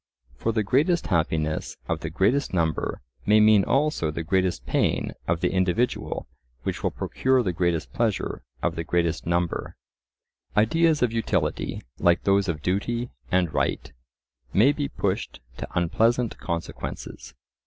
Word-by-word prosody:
For 115 - -1
the 110 -1 0
greatest 150 - +2
happiness 80 -2 -1
of 80 - -1
the 80 - -4
greatest 100 - +1
number 80 -6 0 0.3
may 105 +1 +6
mean 105 -2 +6
also 140 - +1
the 80 +2 -3
greatest 95 +1 0
pain - - +1 0.2
of 85 0 0
the - - +1
individual 95 +6 0 0.4
which - - -3
will - - +1
procure 130 -1 +1
the 90 -4 -1
greatest 85 -2 -1
pleasure 115 -4 -1 0.2
of - - 0
the 80 - -2
greatest 85 0 0
number. 85 0 -1 0.8
Ideas 155 +7 +3
of 120 -2 +1
utility, 90 -9 -1 0.2
like 85 0 +3
those 100 0 +3
of 75 -3 -3
duty 115 +6 -1 0.2
and 90 -4 +2
right, - - -1 0.6
may 115 - +5
be 145 -1 -2
pushed - - -2 0.2
to - - -5
unpleasant 115 +7 +2
consequences. 85 -2 -5
95 Hz, 145 wpm, -25 LUFS, 85-115 Hz, 0.8 s, may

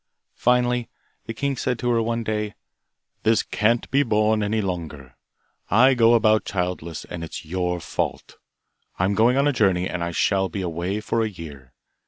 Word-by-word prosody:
Finally, 125 -1 +1 0.4
the 115 - -4
king 140 +3 -1
said 125 -1 -1
to 120 +1 -1
her 115 -1 +2
one 115 +1 -1
day, 105 -1 -3 0.7
'This 110 0 +3
can't 115 +3 +1
be 140 +2 +4
borne 110 -3 +2
any 105 +2 0
longer. 80 -9 -5 0.5
I 125 +7 +5
go 120 -1 +5
about 110 -1 +3
childless, 90 -4 -4
and 85 -1 -7
it's 85 - -7
your 90 +1 -2
fault. - - -4 0.6
I 90 - +1
am 100 - +1
going 115 +5 +3
on 140 +1 +3
a 145 - +2
journey 95 -6 +2
and 90 -1 -3
shall 95 -1 +1
be 95 +3 -4
away 90 +4 -3
for 115 +1 -1
a 110 - 0
year. 75 -9 -11
105 Hz, 175 wpm, -23 LUFS, 90-115 Hz, 0.7 s, I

